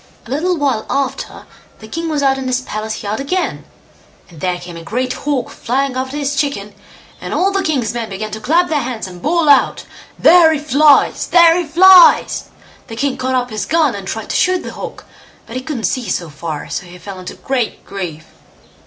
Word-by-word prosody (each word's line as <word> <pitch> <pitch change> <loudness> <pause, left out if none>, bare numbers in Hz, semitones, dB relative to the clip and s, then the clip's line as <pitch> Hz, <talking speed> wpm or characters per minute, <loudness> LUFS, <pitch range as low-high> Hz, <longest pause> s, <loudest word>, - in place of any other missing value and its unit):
A 240 - -11
little 345 +6 0
while 270 -7 -1
after 275 -1 -3 0.3
the 220 - -12
king 330 +8 -4
was 295 -2 -1
out 270 -1 +2
in 265 - -4
his 255 0 0
palace 220 -2 -5
yard 210 +3 -3
again, 360 +7 -2 0.7
and 160 -3 -14
there 180 -1 -1
came 175 -1 -10
a 165 - -8
great 250 +8 -2
hawk 280 -5 -2
flying 265 +2 -2
after 260 +2 -3
his 290 0 -2
chicken, 280 -9 -2 0.5
and - - -4
all 385 +2 +2
the 390 0 0
king's 275 -11 -1
men 235 -2 -4
began 210 +2 -5
to 220 - -5
clap 325 +11 +2
their 300 -3 0
hands 245 -3 -4
and 180 -2 -10
bawl 335 - +1
out, 280 -2 +4 0.3
"There 335 -2 +6
he 305 - -1
flies!" 295 0 +3
"There 340 -1 +6
he 355 -1 0
flies!" 360 +3 +6 0.4
The 225 - -8
king 270 +3 -1
caught 260 0 -2
up 250 -1 -1
his 210 -2 -4
gun 315 -5 +2
and 195 -1 -7
tried 220 +2 -4
to - - -2
shoot 370 -1 +2
the - - -7
hawk, - - -8 0.4
but 230 - -10
he 255 - -2
couldn't 260 -4 -5
see 245 -5 -1
so 170 -3 -3
far, 155 0 -6
so 180 - -5
he 175 +1 -12
fell 190 +1 -9
into 185 - -8
great 260 -4 -3
grief. 170 -6 -6
260 Hz, 210 wpm, -17 LUFS, 215-300 Hz, 0.7 s, There